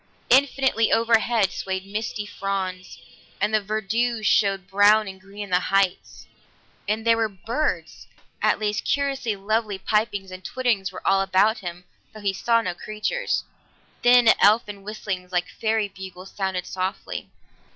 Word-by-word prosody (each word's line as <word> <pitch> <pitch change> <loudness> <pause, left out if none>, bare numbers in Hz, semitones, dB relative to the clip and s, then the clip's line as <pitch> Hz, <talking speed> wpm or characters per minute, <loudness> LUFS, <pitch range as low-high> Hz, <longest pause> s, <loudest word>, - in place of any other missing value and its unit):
Infinitely 265 -3 +3
overhead 225 -3 +3
swayed 190 0 -4
misty 210 +1 -4
fronds, 190 -2 -4 0.4
and 210 +2 0
the 215 - +3
verdure 220 +3 -1
showed 195 -2 +2
brown 205 +2 +5
and 190 0 -9
green 200 +2 -8
in 200 - -9
the 180 - +4
heights. 195 0 0 0.6
And 215 +2 -1
there 230 0 +5
were 225 -1 +1
birds 225 - -3 0.3
at - - +3
least, 210 -1 -1
curiously 275 -6 0
lovely 210 +1 -1
pipings 205 -1 -1
and 185 0 -9
twitterings 235 -6 -1
were 185 - -10
all 195 0 +4
about 195 +4 +3
him 175 -2 -7 0.3
though - - -8
he 200 -1 0
saw 230 +3 +2
no 180 - -2
creatures 215 - -2 0.6
thin 245 -1 +7
elfin 205 -1 +3
whistlings 195 -3 -5
like 180 -1 0
fairy 220 -1 0
bugles 190 -1 -10
sounded 190 -2 -2
softly. 185 +1 -4
205 Hz, 145 wpm, -24 LUFS, 190-225 Hz, 0.6 s, thin